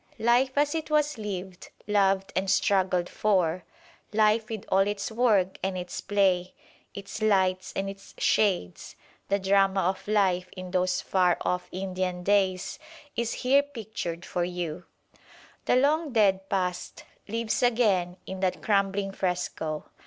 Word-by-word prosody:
Life 250 +4 +2
as 290 0 +3
it 320 -1 -3
was 300 -4 +1
lived, 190 -3 -6 0.2
loved 195 -2 +1
and 190 +1 0
struggled 185 -2 +2
for; 185 -5 +1 0.5
life 215 +1 +2
with 220 -3 -5
all 190 - +3
its 205 +1 -3
work 215 -6 +2
and 190 -1 -2
its 180 0 -5
play, 190 -3 +1 0.4
its 200 +2 -7
lights 190 -3 +2
and 195 - -1
its 195 0 -10
shades; 180 - 0 0.3
the 200 - +3
drama 195 0 +2
of 185 +2 -2
life 185 -4 +1
in 185 0 -7
those 185 0 +1
far 180 -2 +2
off 180 0 -1
Indian 185 -1 -3
days, 190 -2 +1 0.4
is 235 0 -1
here 275 +2 +6
pictured 220 -11 -6
for 175 - -2
you. 175 -1 -4 0.8
The - - +3
long 290 +2 +2
dead 195 -4 +2
past 180 -2 -2 0.2
lives 225 +1 -1
again 205 -8 +2
in 190 0 -6
that 185 -1 -1
crumbling 195 -1 +1
fresco. 180 -5 -3
195 Hz, 140 wpm, -27 LUFS, 180-215 Hz, 0.8 s, here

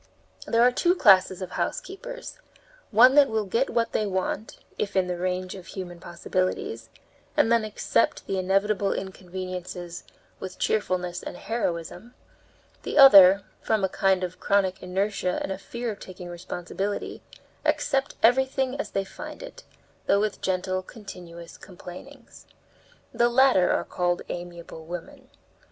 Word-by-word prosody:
There 230 +1 +3
are 250 - +6
two 350 +8 +2
classes 190 - +5
of 185 - -7
housekeepers - - -5 0.5
one 245 +4 +7
that 285 -1 +6
will 220 -1 -1
get 230 +7 0
what 230 -1 0
they 215 - 0
want, 195 +2 -3 0.2
if 200 -1 -2
in 190 -1 +3
the 180 -1 -4
range 185 0 -2
of 190 -2 -11
human 175 -3 -7
possibilities, 170 -10 -3 0.5
and 225 - +4
then 230 -1 +4
accept 215 +1 0
the 195 - -2
inevitable 195 +2 +1
inconveniences 185 -2 -6 0.4
with 190 -1 -7
cheerfulness 180 -4 -1
and - - -7
heroism; 180 +1 -4 0.7
the - - -4
other, 200 -8 +9 0.2
from 215 -3 0
a 190 - +2
kind 190 -2 +1
of 180 0 -5
chronic 195 -2 +1
inertia 185 0 -1
and - - -4
a 190 - -4
fear 235 +3 -4
of 205 - -9
taking 180 -1 -9
responsibility, 180 +3 -5 0.4
accept 290 -2 0
everything 265 +2 +3
as - - -3
they 195 - -1
find - - -9
it, - - -10 0.5
though 200 - +4
with 215 0 -2
gentle, 185 0 -1
continuous 175 -5 -11
complainings. 195 +8 -12 0.7
The 240 0 +3
latter 245 -7 +4
are - - 0
called 175 0 -1
amiable 175 -2 -7
women. 175 0 -8
190 Hz, 140 wpm, -26 LUFS, 180-230 Hz, 0.7 s, other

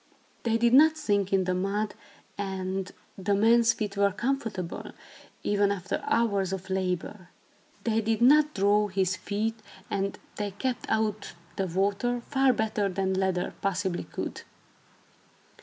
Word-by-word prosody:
They 230 -1 +1
did 235 +1 +3
not 310 +4 +7
sink 200 -8 0
in 195 -1 +3
the 185 0 0
mud 200 +3 -1 0.4
and 190 -1 -3 0.3
the 200 +1 +1
man's 230 +3 +5
feet 210 -2 -4
were 200 0 +3
comfortable, 225 -6 -3 0.5
even 205 -1 +2
after 195 -1 -3
hours 200 -5 +1
of 190 0 -5
labor. 185 0 -2 0.5
They 225 -1 +1
did 225 0 0
not 300 +5 +5
"draw" 205 +1 +3
his 190 -1 0
feet, 220 +4 -2 0.3
and 200 0 -1 0.2
they 205 -1 -2
kept 255 0 -2
out 215 -1 -1 0.2
the 195 - -1
water 200 +7 0
far 270 +1 +2
better 220 -3 0
than 190 0 -1
leather 190 -1 0
possibly 190 -2 -1
could. - - -5
200 Hz, 140 wpm, -28 LUFS, 190-225 Hz, 0.5 s, not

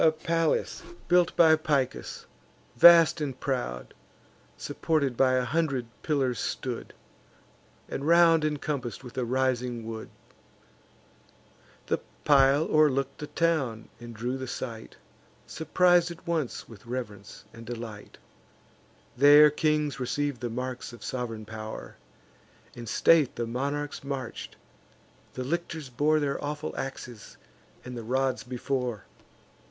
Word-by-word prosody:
The 160 - +6
palace 165 +1 -1 0.3
built 180 0 +3
by 160 -2 +7
Picus, 145 -5 -2 0.5
vast 165 +3 +7
and 135 -4 -3
proud, 120 - -3 0.6
Supported 145 -6 -1
by 130 +1 +3
a 130 -1 +1
hundred 140 -3 0 0.2
pillars 135 -6 0
stood, - - -4 0.9
And 140 - -4
round 165 -1 +6
incompass'd 145 -5 -3
with 125 - -11
a 125 - 0
rising 125 -2 -1
wood. 110 -1 -6 1.8
The - - 0 0.3
pile 140 +1 +5
o'erlook'd 140 -4 +2
the 150 - -5
town, 140 -11 -1
and 120 -1 -10
drew 120 +4 -3
the 130 - -5
sight; 115 -3 -6 0.5
Surpris'd 175 +1 +2
at 170 +1 -10
once 160 -7 -2
with 115 0 -14
reverence 110 -6 -7
and 115 - -11
delight. 115 -3 -8 1.0
There 145 +3 +8
kings 150 -1 0
receiv'd 140 0 -2
the 120 - -2
marks 125 +1 -5
of 120 - -12
sov'reign 115 -4 -4
pow'r; 110 0 -8 0.8
In 120 -1 -9
state 155 +4 +4
the 120 - -2
monarchs 140 +5 -3
march'd; 135 -4 -6 0.8
the 130 - -3
lictors 160 -1 -4
bore 150 +5 +2
Their 140 -1 -2
awful 150 +1 -4
axes 130 -4 -7 0.5
and 125 0 -7
the 120 - -5
rods 130 +3 0
before. 125 -2 -3
135 Hz, 120 wpm, -27 LUFS, 120-155 Hz, 1.8 s, There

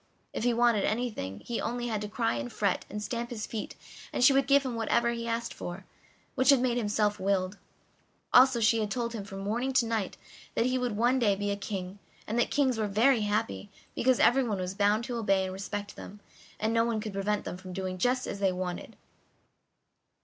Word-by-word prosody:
If - - -3
he 245 - +4
wanted 235 -3 +3
anything 215 - -2
he 235 - -3
only 240 +1 -2
had 220 -3 -2
to 210 - -3
cry 225 +2 0
and 120 +1 -4
fret - - 0
and 210 +1 -5
stamp 235 +2 -3
his 220 -4 -4
feet 220 -2 -5 0.4
and - - 0
she 270 - +8
would 270 0 +3
give 280 0 +5
him 255 - -2
whatever 235 +1 +1
he 235 0 -4
asked 230 0 -2
for, 180 +2 -7 0.5
which 260 0 +2
had 275 -2 +7
made 245 -1 +1
him 210 -3 -2
self 210 0 +1
willed; 190 0 0 0.7
also 255 -1 +7
she 225 0 +3
had 210 -1 -1
told 235 +2 -2
him 215 -3 -4
from 195 -1 -8
morning 235 +7 -1
to 255 -2 +4
night 225 -4 -2 0.4
that 230 - +2
he 255 0 +1
would 245 -4 -2
one 245 +4 +3
day 210 -5 +3
be 205 +1 -2
a - - 0
king, 195 -1 -5 0.3
and 225 +3 -1
that 240 - +2
kings 260 -5 +1
were 215 - +1
very 225 +4 +3
happy, 210 0 -1 0.2
because 255 0 +2
everyone 240 -4 +3
was 185 0 -3
bound 205 +3 +2
to 240 0 -4
obey 195 -4 +2
and 185 0 -4
respect 200 +1 -5
them, 205 - -10 0.4
and 220 +1 0
no 230 0 +4
one 230 -2 0
could 215 -1 -5
prevent 205 +1 -1
them - - -4
from 185 0 -10
doing 185 0 -4
just 250 +4 +1
as 200 - -5
they 195 -2 +2
liked. 180 -1 -5
220 Hz, 220 wpm, -29 LUFS, 200-240 Hz, 0.7 s, she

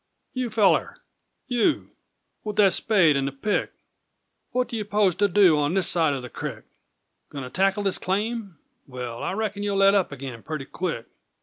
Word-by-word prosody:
you 255 -2 -2
feller! 215 -3 +2 0.5
You 245 +4 0 0.5
With 210 -1 -4
that 200 -4 +5
spade 185 -9 +3
and 135 0 0
the - - -2
pick! 170 +10 -1 0.8
What 250 0 0
do - - -6
you 215 - -2
'pose 205 -2 +2
to 205 - +3
do 180 -5 +5
On 145 +4 0
this 190 -3 +2
side 160 -4 +2
o' 130 - -5
the 125 - -7
crick? - - -7 0.6
Goin' 140 -2 -6
to 125 - -8
tackle 195 +4 +1
this 195 -2 -1
claim? 205 -1 -2 0.3
Well, 125 -3 -6
I - - -2
reckon 205 -1 -3
You'll 205 -1 -1
let 195 0 +5
up 195 -6 +2
agin 130 -4 -7
purty 155 -1 -5
quick! 165 -10 -4
195 Hz, 185 wpm, -25 LUFS, 145-210 Hz, 0.8 s, that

